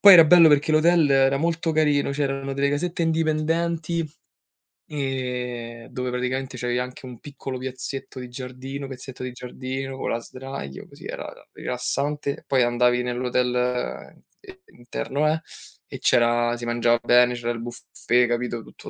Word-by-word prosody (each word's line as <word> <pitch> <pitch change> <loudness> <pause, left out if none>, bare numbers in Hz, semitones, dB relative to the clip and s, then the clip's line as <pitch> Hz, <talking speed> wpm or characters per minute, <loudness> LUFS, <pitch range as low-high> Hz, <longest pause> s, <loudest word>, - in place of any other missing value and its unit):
Poi 200 -1 +11
era 165 -2 +10
bello 170 0 +8
perché 150 +1 +3
l'hotel 160 -1 +4
era 135 0 +4
molto 165 +2 0
carino, 150 -3 +2
c'erano 135 -1 -2
delle 140 +1 +1
casette 170 +4 -1
indipendenti, 165 +1 0 0.8
ehm, 125 -4 -4
dove 125 0 -3
praticamente 130 +1 -2
c'avevi 120 0 -1
anche 125 +1 -4
un 125 -3 -10
piccolo 135 -2 -6
piazzetto 130 +1 -6
di 125 -1 -7
giardino 130 +2 -6
pezzetto 130 -1 -8
di 130 - -4
giardino, 130 +2 -5
con - - -2
la 115 - 0
sdraio 130 - -8
così - - -14
era - - -5
era - - -17
rilassante, 140 +3 -2
poi 135 -2 +2
andavi 125 0 +3
nell'hotel 125 0 -1 0.2
i 380 -2 -13 0.2
interno 135 +4 -2
eh, 160 - -1 0.5
e - - -7
c'era 120 0 +3
si 120 - -6
mangiava 120 0 +2
bene, 125 0 +5
c'era 120 -1 -3
il 115 -1 -5
buffet, 120 0 0
capito, 120 0 -1
tutto - - -12
130 Hz, 150 wpm, -24 LUFS, 125-145 Hz, 0.8 s, Poi